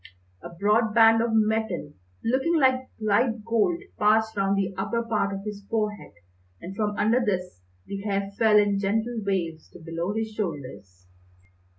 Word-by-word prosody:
A - - -8
broad 215 +2 +2
band 225 0 +6
of 235 - 0
metal 220 -8 0 0.3
looking 265 +8 +1
like 260 -2 +2
light 220 +1 +1
gold 230 - +1 0.2
passed 220 +1 +3
round 195 0 +1
the 195 0 -1
upper 225 +5 -1
part 215 -3 0
of 195 0 -5
his 205 -1 -6
forehead, 210 -2 -2 0.5
and 190 +3 -8
from 210 -1 -1
under 220 +4 +3
this 180 - -2 0.2
the 200 0 -6
hair 200 -1 -2
fell 220 -1 +4
in 205 -1 +3
gentle 220 +4 -1
waves 170 -5 -2
to - - -14
below 165 +3 -4
his 220 0 -2
shoulders. 125 - -6
210 Hz, 160 wpm, -25 LUFS, 195-225 Hz, 0.5 s, band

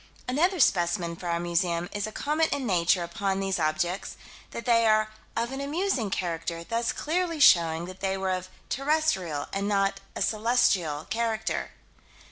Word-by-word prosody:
Another 340 +9 +1
specimen 175 - +2
for 175 - -7
our 170 0 0
museum 170 0 0
is 205 0 -2
a - - -6
comment 305 +6 0
in 280 -2 -1
Nature 180 -3 +2
upon 190 +3 -2
these 195 -2 -1
objects: 160 +4 -1 0.3
that 230 - -7
they 230 -2 +4
are 215 0 +3 0.3
"of 235 +2 -1
an 270 +1 -4
amusing 285 - -1
character, 170 -2 -3
thus 230 +6 -1
clearly 335 0 -1
showing 170 - +5
that 185 +1 -10
they 195 0 -1
were 190 0 -1
of 185 0 -3 0.2
terrestrial, 275 - 0
and 200 +1 -1
not 195 -1 +1 0.2
a - - 0
celestial, 210 -9 +1
character." 225 -1 -1
195 Hz, 160 wpm, -27 LUFS, 175-240 Hz, 0.3 s, showing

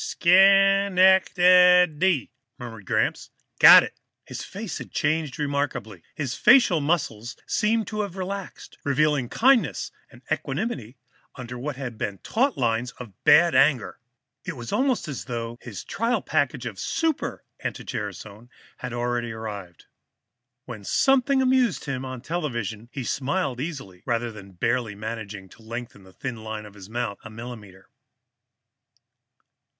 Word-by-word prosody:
"Schen 195 +1 +4
ec 190 0 +5
ta 180 0 +7
dy," 160 -3 0 0.3
murmured 115 -5 -9
Gramps. - - 0 0.3
"Got - - +10
it!" - - -9 0.3
His - - -7
face - - -6
had - - -9
changed 150 -1 -1
remarkably. 140 - -3
His 135 -4 -3
facial 240 - +5
muscles 125 -7 -2
seemed 220 0 +1
to 215 -1 -2
have 200 -3 -5
relaxed, 195 +1 -7
revealing 140 -2 +1
kindness 260 0 +2 0.2
and - - -18
equanimity 135 - -3 0.4
under 125 -2 -8
what 135 +3 -5
had 125 -5 -7
been 100 -1 -3
taut 260 - 0
lines 120 0 0
of 120 -6 -11
bad 170 +4 +6
temper. 130 -7 +2 0.4
It - - -5
was 120 -2 -7
almost 255 -9 +1
as 140 -4 -6
though 115 -1 -5
his 105 -8 -8
trial 230 +3 -1
package - - -1
of - - -6
Super 325 -3 -2 0.2
anti - - -5
gerasone 105 0 -7 0.3
had 125 -1 -6
already 120 -1 -2
arrived. 100 -6 -8 0.8
When 110 -5 -9
something 270 - +2
amused 255 - +2
him 130 -1 -4
on 130 -2 -7
television, 120 - -4
he 135 - -5
smiled 130 0 -2
easily, 135 - -7
rather 120 -1 -1
than 100 -3 -12
barely 115 +2 -1
managing 105 -2 -7
to 115 - -18
lengthen 115 -2 -8
the 95 - -17
thin 120 -1 -6
line 110 -1 -6
of 105 - -13
his 100 -1 -13
mouth 115 -3 -3
a 115 - -9
millimeter. 110 -4 -10
125 Hz, 145 wpm, -24 LUFS, 110-180 Hz, 0.8 s, Got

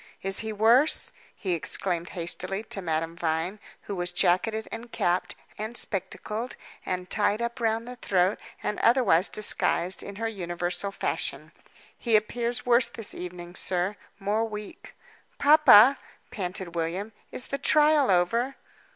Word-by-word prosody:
"Is 195 0 +1
he 220 -1 -3
worse?" 230 +8 +3 0.2
he 185 -4 -2
exclaimed 175 +1 -2
hastily, 185 +4 -2
to 200 - -2
Madame 165 -1 -2
Vine, 170 +4 -2 0.2
who - - -6
was 175 0 -2
jacketed, 215 +5 +2
and 230 +1 -8
capped, 175 +1 -1 0.2
and 220 +3 -4
spectacled, 210 +5 -3 0.3
and 180 0 -3
tied 210 +2 +1
up 235 0 -3
round 225 0 0
the 250 0 -8
throat, 185 -3 +1 0.2
and 210 - -2
otherwise 220 -8 +4
disguised, 190 -3 +2
in 200 - -8
her 225 +2 -2
universal 175 -2 -3
fashion. 195 - -3 0.4
"He 230 -3 0
appears 235 +3 0
worse 240 0 +4
this 225 -3 -3
evening, 175 -1 -8
sir 185 +2 0 0.2
more 205 +3 0
weak." 210 -2 -9 0.4
"Papa," 280 -4 +7 0.3
panted 185 -2 -5
William, 175 +6 -3 0.2
"is 255 - -5
the 275 - -3
trial 300 -1 +4
over?" 230 +9 +1
205 Hz, 140 wpm, -27 LUFS, 180-230 Hz, 0.4 s, Papa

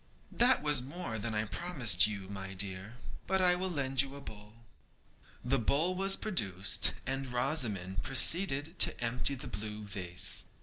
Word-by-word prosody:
'That 245 -4 +2
was 150 -3 +3
more 135 -4 -6
than 110 +1 -4
I 105 +1 -1
promised 135 - +3
you, 105 -2 -6
my 95 -1 -9
dear, 95 +3 -4 0.3
but 190 +1 0
I 180 -1 +3
will 185 +1 -3
lend 135 -5 0
you 140 0 -6
a - - -9
bowl.' 110 -2 -13 0.8
The 135 +2 0
bowl 150 +10 0
was 195 +1 +2
produced, 100 - 0
and 135 0 -5
Rosamond 115 - -1
proceeded 160 - +3
to - - +6
empty 125 +3 +1
the 130 - -9
blue 105 +1 -7
vase. 95 -2 -4
125 Hz, 160 wpm, -30 LUFS, 105-155 Hz, 0.8 s, to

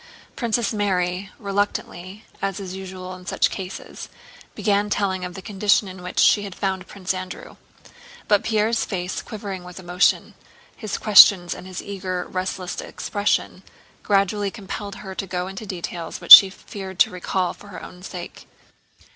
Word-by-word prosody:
Princess 235 -2 -1
Mary—reluctantly 195 0 -2 0.2
as 195 0 -2
is 190 -2 -7
usual 185 -1 -7
in 185 0 -11
such - - +1
cases—began 205 +2 -4
telling 190 -3 -1
of 180 -1 -6
the 190 - -9
condition 205 0 +2
in 185 -1 -9
which 180 - -8
she 205 - +5
had 200 -2 -7
found 190 -2 -3
Prince 190 -2 -3
Andrew. 185 0 -8 0.7
But 205 -1 +3
Pierre's 225 +1 +1
face 180 -2 -4
quivering 200 -4 -7
with 180 +1 -10
emotion, 180 0 +1 0.4
his 215 -4 -4
questions 200 -4 +7
and 185 - -10
his 185 - -7
eager 185 -2 -4
restless 185 -1 -4
expression, 205 -2 -2 0.4
gradually 200 0 +1
compelled 200 0 -7
her 190 -1 -8
to 195 - -5
go 180 0 -3
into 195 +3 -8
details 175 -2 -6
which - - +10
she 195 - +12
feared 190 -1 -9
to 220 - +4
recall 180 0 -2
for 205 - -16
her 180 -5 -9
own 180 - -13
sake. 180 -2 -9
190 Hz, 150 wpm, -22 LUFS, 185-205 Hz, 0.7 s, she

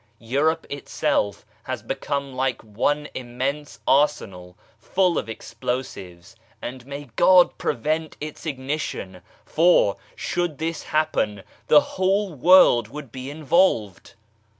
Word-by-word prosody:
Europe 145 +8 0
itself 105 -7 -2 0.2
has 130 - -4
become 140 0 -3
like 130 -1 -1
one 145 +8 -1
immense 130 +4 -4
arsenal, 95 -11 +1 0.2
full 180 - +1
of - - -7
explosives, 115 -4 -6 0.2
and 125 +1 -8
may 140 +1 -7
God 185 -1 +6
prevent 155 +5 -2
its 155 +2 -7
ignition 130 -9 -4 0.2
for, 160 - +3 0.2
should 175 -4 -2
this 165 +1 -3
happen, 130 -10 -1 0.2
the 150 - +7
whole 190 0 0
world 150 -6 +6
would 140 0 -9
be 130 +2 -7
involved. 145 - +1
140 Hz, 110 wpm, -23 LUFS, 115-155 Hz, 0.2 s, the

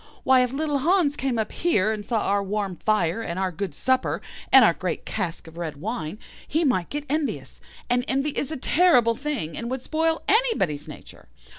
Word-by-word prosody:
Why, 260 -1 +5
if 250 - -2
little 290 +1 -1
Hans 325 -1 +2
came 265 -3 -1
up 220 -1 -1
here, 220 - +1
and 215 -1 -4
saw 220 0 -1
our 200 0 +1
warm 200 -1 -2
fire, 210 -1 +1
and 170 -5 -4
our 190 -1 0
good 175 -2 -5
supper, 260 - +1 0.3
and 265 -3 +9
our 170 - +5
great 180 0 -4
cask 170 -2 -3
of 165 +1 -11
red 160 -4 -4
wine, 205 0 -4 0.3
he 320 +3 +1
might 235 - +1
get 295 0 -4
envious, 300 +1 -3 0.3
and 245 0 +1
envy 275 +3 0
is 280 - -2
a - - -2
most 260 - -10
terrible 255 -10 +4
thing, 275 - -4
and 235 - -4
would 260 0 -4
spoil 320 +1 0
anybody's 415 - +1
nature. - - -12
245 Hz, 200 wpm, -24 LUFS, 190-290 Hz, 0.3 s, and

